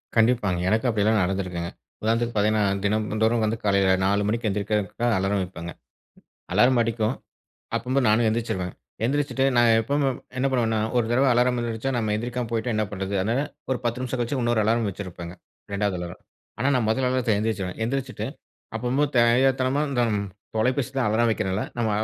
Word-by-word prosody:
கண்டிப்பாங்க. 110 -6 +3
எனக்கு 110 +4 +1
அப்படியலாம் 110 -1 +2
நடந்திருக்குங்க. 90 -2 -2 0.3
உதாரணத்துக்கு 115 +2 0
பார்த்தீங்கன்னா, 105 +1 +2 0.2
தினந்தோறும் 110 +2 +1
வந்து 110 +1 -1
காலையில 100 -2 +4
4 100 +1 +2
மணிக்கு 115 +1 0
எந்திரிக்கிறதுக்காக 105 +3 -1
அலாரம் 95 +1 0
வைப்பேங்க. 85 -2 -7 0.8
அலார்ம் 120 +5 +4
அடிக்கும் 115 +1 0 0.6
அப்பம்போ, 125 +4 0
நானு 110 +2 +3
எந்திரிச்சுருவே. 110 -5 -2 0.4
எந்திரிச்சுட்டு, 140 +1 0
நா 120 - +5 0.2
எப்பவுமே 140 +4 0
என் - - -9 0.2
என்ன 130 +1 +2
பண்ணுவேன்னா, 115 -4 +1 0.2
ஒரு 120 - +2
தடவ 130 +3 +3
அலாரம் 125 +1 +2
வந்துருச்சா, 120 +2 -2
நம்ம 110 -2 0
எந்திரிக்காம 120 +1 -3
போய்ட்டா 115 +2 -1
என்ன 110 - +1
பண்ணுறது, 95 -1 -4
அதனால 115 +8 0 0.3
ஒரு 130 - +1
10 120 +1 -1
நிமிஷம் 130 0 -3
கழிச்சு 120 +4 -1
இன்னொரு 120 -2 +2
அலார்ம் 115 +1 +2
வச்சிருப்பேங்க, 90 -3 -7 0.4
2வது 100 -2 0
அலாரம்.ஆனா 90 +7 -7
நா - - +3
முத 110 +4 +1
அலாரத்தில 125 -4 +1
எந்திரிச்சுடுவேன். 105 -4 -2
எந்திரிச்சுட்டு, 130 +1 -3 0.5
அப்பம்போ 125 +5 +1
தெரியாத்தனமா 130 +3 +3
இந்த 125 -3 +1 0.5
தொலைபேசி 130 +3 +1
தா - - +2
அலாரம் 115 +2 +2
வைக்கிறேன் 105 -4 -1
இல்ல, 105 - -1
நம்ம 115 -2 +1
115 Hz, 160 wpm, -25 LUFS, 105-125 Hz, 0.8 s, நா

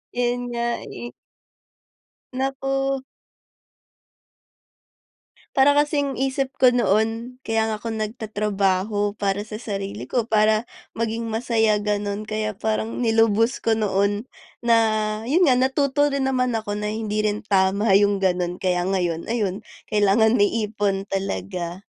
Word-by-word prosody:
'Yun 245 0 0
nga, 235 0 -1 0.2
eh. 240 - -8 1.2
Naku. 270 +1 -1 2.5
Para 270 +2 +6
kasing 290 -2 +1
isip 270 0 -1
ko 255 - +7
noon 230 +2 0
kaya 225 -2 0
nga 220 -1 -3
ako 230 - -5
nagtatrabaho 210 -2 -1
para 200 0 -1
sa 210 0 -6
sarili 200 -2 -5
ko, 235 -2 -1
para 215 +1 +2 0.2
maging 230 0 -2
masaya 220 -2 +1
gano'n 205 0 -2
kaya 215 0 -2
parang 220 +3 -2
nilubos 225 0 +3
ko 225 - +3
noon 205 +1 0 0.3
na 235 -1 +4 0.5
'yun 315 +7 +3
nga 255 - +5
natuto 280 +2 +2
rin 270 -1 0
naman 255 -1 +1
ako 215 -2 -2
na 210 0 -2
hindi 215 -1 -2
rin 210 0 0
tama 195 0 +3
'yung 205 -1 +3
gano'n 180 -1 0
kaya 180 -1 +1
ngayon 175 -3 -1
ayun 210 -3 -2 0.2
kailangan 215 +2 +3
may 205 -2 +3 0.2
ipon 200 -2 -1
talaga. 175 - -3
215 Hz, 125 wpm, -23 LUFS, 205-245 Hz, 2.5 s, ko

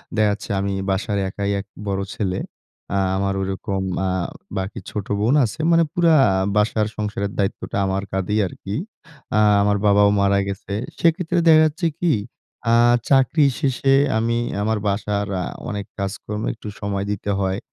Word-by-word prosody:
দেখা 110 -1 +3
যাচ্ছে 105 - -8
আমি 100 0 -1 0.2
বাসার 100 +2 -1
একাই 100 +1 -2
এক 100 - -6 0.2
বড় 95 0 -1
ছেলে। 95 -3 -1 0.6
আ - - +2 0.2
আমার 100 0 0
ওরকম 95 0 -3 0.3
আ - - 0 0.5
বাকি 95 +2 -4
ছোট 105 -2 -4
বোন 115 +6 +2
আছে। 115 - -6
মানে 165 0 +5
পুরা 170 -2 +4 0.4
বাসার 105 0 +2
সংসারের 105 -1 -2
দায়িত্বটা 100 0 -2
আমার 95 +1 -1
কাধেই 95 +3 0
আরকি। 100 +3 -7 0.6
আ - - +5 0.2
আমার 100 0 +2
বাবাও 100 0 +5
মারা 100 0 +3
গেছে। 100 0 -5 0.3
সেক্ষেত্রে 170 +1 +1
দেখা 155 -1 +8
যাচ্ছে 165 +3 -2
কি? 175 -3 +2 0.6
আ - - +6 0.3
চাকরি 140 +2 +4
শেষে 135 -1 +2 0.2
আমি 115 +1 +1 0.2
আমার 110 +1 +1
বাসার 100 0 -1
আ - - -2 0.3
অনেক 100 -1 -4
কাজকর্ম 105 +2 -4
একটু 110 -1 -11
সময় 100 -1 -2
দিতে 100 0 -3
হয়। 95 0 0
105 Hz, 155 wpm, -21 LUFS, 100-115 Hz, 0.6 s, দেখা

